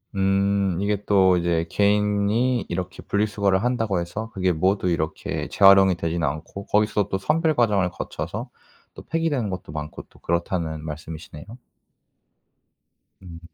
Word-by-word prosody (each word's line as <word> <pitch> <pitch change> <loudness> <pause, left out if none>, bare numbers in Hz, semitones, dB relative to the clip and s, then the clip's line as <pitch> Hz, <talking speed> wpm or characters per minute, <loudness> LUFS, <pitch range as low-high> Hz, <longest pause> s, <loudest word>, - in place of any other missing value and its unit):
음. 95 -1 +1
이게 105 0 -1
또 95 -3 +4
이제 85 -1 0
개인이 105 +5 +1
이렇게 90 +1 -4
분리수거를 100 -1 0
한다고 115 -7 0
해서 105 +6 -5
그게 95 -1 +1
모두 95 +3 +1
이렇게 80 -2 -2
재활용이 95 -2 +6
되진 85 0 -2
않고 75 +7 -4
거기서 105 -1 +1
또 95 - -1
선별 155 - +1
과정을 105 -6 +2
거쳐서 - - -6 0.4
또 - - -11
폐기되는 150 -9 -1
것도 90 -5 -6
많고 75 0 -6
또 - - -22
그렇다는 85 -2 -2
말씀이시네요. 75 0 -8 1.8
음. 85 -3 -10
95 Hz, 310 characters per minute, -23 LUFS, 85-105 Hz, 1.8 s, 재활용이